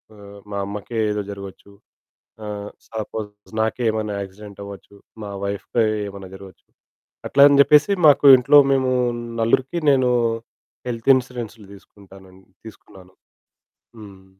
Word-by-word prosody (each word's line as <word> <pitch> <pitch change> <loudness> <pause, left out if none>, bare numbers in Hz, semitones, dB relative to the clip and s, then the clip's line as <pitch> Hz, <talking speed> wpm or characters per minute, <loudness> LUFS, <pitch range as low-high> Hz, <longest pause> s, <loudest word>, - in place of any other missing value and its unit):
ఆహ్, 100 0 -14
మా 100 - -4
అమ్మకే 105 +3 -6
ఏదో 105 0 -3
జరగొచ్చు. 100 0 -11 0.7
ఆహ్, 105 -1 -6 0.2
సపోజ్ 105 -1 -8
నాకే 110 +3 -1
ఏమైనా 105 -2 -3
యాక్సిడెంట్ 100 +1 -11
అవ్వొచ్చు. 100 0 -12 0.3
మా 100 - -7
వైఫ్‌కి 100 +3 -1 0.2
ఏమైనా 95 -1 -10
జరగొచ్చు. 95 -2 -14 0.6
అట్లా 140 - +3
అని 140 -1 +3
జెప్పేసి 150 +7 +5
మాకు 145 0 +5
ఇంట్లో 135 +4 +5
మేము 130 -1 +1 0.5
నలుగురికి 130 +8 0
నేను 130 -2 +2 0.8
హెల్త్ 115 +2 -1
ఇన్స్యూరెన్సు‌లు 120 -4 -5
దీసుకుంటానని 95 -1 -18 0.2
తీసుకున్నాను. 95 -4 -15 0.9
హ్మ్. 95 -2 -14
105 Hz, 115 wpm, -21 LUFS, 100-120 Hz, 0.9 s, జెప్పేసి